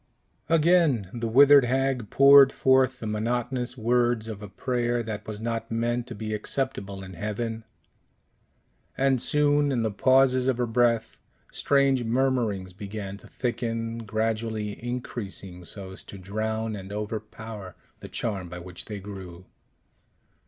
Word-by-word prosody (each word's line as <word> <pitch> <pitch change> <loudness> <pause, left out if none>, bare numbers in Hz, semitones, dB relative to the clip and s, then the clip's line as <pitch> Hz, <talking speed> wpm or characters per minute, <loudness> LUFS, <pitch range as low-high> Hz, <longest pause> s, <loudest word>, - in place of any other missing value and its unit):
Again 160 - +3
the 115 -1 -3
withered 140 +3 +7
hag 130 -2 0
poured 140 0 +8
forth 130 -1 +3
the - - -6
monotonous 120 +3 -2
words 120 -1 +1
of 105 -2 -6
a 105 - -8
prayer 120 +2 -1
that 105 -2 -6
was 105 -1 -5
not 115 0 -3
meant 120 +1 -1
to 120 - -7
be 110 +1 -4
acceptable 105 -4 -3
in 95 0 -9
heaven; 110 +4 -4 1.3
and 135 -2 +2
soon, 145 0 +2
in 120 -4 0
the 110 - 0
pauses 130 +3 +3
of 130 -3 +2
her 125 - +1
breath, 115 -1 +1 0.3
strange 140 -2 +2
murmurings 115 -6 0
began 100 0 -6
to - - -16
thicken, 115 -2 -3
gradually 110 0 -2
increasing 100 -7 -5
so 95 +2 -8
as 95 - -9
to 100 - -10
drown 110 +3 -3
and 95 -1 -8
overpower 105 -2 -6 0.2
the - - -10
charm 95 -6 -2
by 90 - -7
which 90 0 -7
they 105 -2 -6
grew. 95 -3 -9
115 Hz, 140 wpm, -26 LUFS, 105-125 Hz, 1.3 s, poured